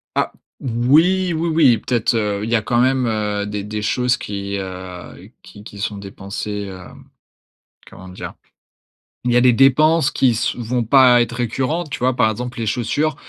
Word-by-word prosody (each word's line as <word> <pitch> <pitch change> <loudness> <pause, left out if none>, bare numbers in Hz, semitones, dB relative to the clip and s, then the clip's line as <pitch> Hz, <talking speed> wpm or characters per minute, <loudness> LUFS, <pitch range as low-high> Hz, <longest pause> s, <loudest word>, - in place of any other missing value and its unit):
Ah! - - 0 0.3
Oui, 160 +10 +2
oui, 165 +1 -1
oui, 145 -8 +4
peut-être, 120 -1 0
heu, 105 -2 -1
il 115 - -4
y 120 - +2
a 110 - +1
quand 120 +2 +1
même, 130 0 +2
heu, 105 -2 -1
des 105 -1 -4
des 105 0 -5
choses 125 +3 +1
qui, 100 0 -5
heu, 95 -1 -8
qui 105 - -14
qui 105 -2 -11
sont 105 0 -3
dépensées, 100 +1 -6
hem, 90 - -13 0.8
comment 95 0 -13
dire? 90 - -8 0.9
Il 120 - +1
y 120 - +4
a - - +4
des 125 -1 +5
dépenses 150 +4 +4
qui 130 -2 +2
s 115 +1 -1
vont 120 +1 -2
pas 125 0 +5
être 120 0 -2
récurrentes, 130 +7 -2
tu - - -4
vois? 125 0 +1
Par 110 - +3
exemple, 125 +3 -6
les 115 - -3
chaussures, 145 +7 -1
120 Hz, 185 wpm, -19 LUFS, 105-130 Hz, 0.9 s, des